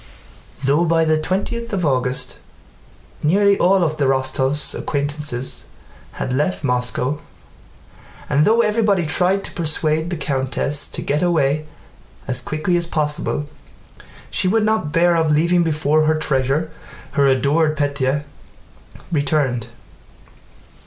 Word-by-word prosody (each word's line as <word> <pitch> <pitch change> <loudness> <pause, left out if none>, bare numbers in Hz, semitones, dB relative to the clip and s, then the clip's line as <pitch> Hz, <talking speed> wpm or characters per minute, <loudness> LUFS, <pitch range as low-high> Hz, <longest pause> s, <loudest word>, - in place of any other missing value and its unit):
Though 145 +5 +3
by 165 -1 +2
the 155 0 +2
twentieth 205 +7 -3
of 185 -4 0
August 125 -2 0 0.8
nearly 200 +6 +3
all 185 -1 +4
the 150 -2 -1
Rostóvs' 130 +2 +1
acquaintances 145 -3 -2 0.5
had 130 - -3
left 150 +6 -1
Moscow, 125 +2 0 1.1
and 145 +2 +2
though 225 +6 +4
everybody 210 -5 +1
tried 180 +6 +1
to - - -3
persuade 160 -1 -1
the 175 - -2
countess 140 0 -1
to - - -6
get 145 +2 0
away 155 -4 +1 0.6
as 125 -1 0
quickly 155 +7 -1
as 170 -1 -2
possible, 150 -2 -2 0.8
she - - +1
would 215 +3 +2
not 215 -8 0
hear 175 +1 +4
of 160 -2 +2
leaving 170 +4 +3
before 155 -1 +1
her 155 +1 +2
treasure, 145 +2 +1 0.4
her 140 -2 +2
adored 150 +4 +2
Pétya, 140 -1 0 0.9
returned. 140 -6 0
155 Hz, 120 wpm, -20 LUFS, 140-170 Hz, 1.1 s, all